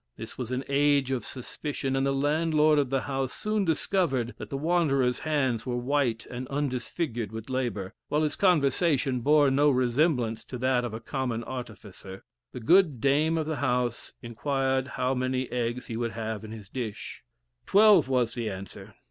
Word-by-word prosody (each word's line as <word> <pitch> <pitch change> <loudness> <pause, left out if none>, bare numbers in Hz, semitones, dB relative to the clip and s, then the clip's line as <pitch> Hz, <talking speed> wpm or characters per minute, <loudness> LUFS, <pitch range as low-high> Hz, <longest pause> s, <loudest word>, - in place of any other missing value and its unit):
This - - -8
was 125 -1 -5
an 130 +1 -2
age 140 -1 +2
of 125 -4 -1
suspicion, 135 +2 -4
and 135 +1 +1
the - - +2
landlord 150 +2 +2
of 140 -3 0
the 135 0 0
house 135 -2 -2
soon 215 -1 -1
discovered 155 - 0
that - - -7
the 135 - -3
wanderer's 140 -5 +1
hands 135 -7 0
were 125 -2 -2
white 125 -2 0
and 125 +1 -5
undisfigured 130 - -3
with 110 +3 -7
labor, 115 -7 -2
while 150 +1 +1
his 150 - -1
conversation 145 -6 +2
bore 145 +1 +4
no 145 +2 +4
resemblance 125 -3 +1
to 125 - -6
that 130 0 +1
of 115 -2 -4
a - - -5
common 120 -1 -3
artificer. 105 -6 -8 0.3
The - - -7
good 165 0 +4
dame 150 +6 +2
of 160 - -1
the 155 -1 -3
house 125 -3 -1
inquired 130 +2 -1
how 130 -1 -1
many 130 0 -2
eggs 120 0 -2
he 115 - -5
would 115 -1 -2
have 110 -1 -4
in 110 - -8
his 110 -3 -9
dish. 110 -2 -6 0.4
Twelve, 200 -8 +6
was 125 -3 +1
the 115 -3 -3
answer. 95 -1 -9
130 Hz, 175 wpm, -27 LUFS, 120-145 Hz, 0.4 s, Twelve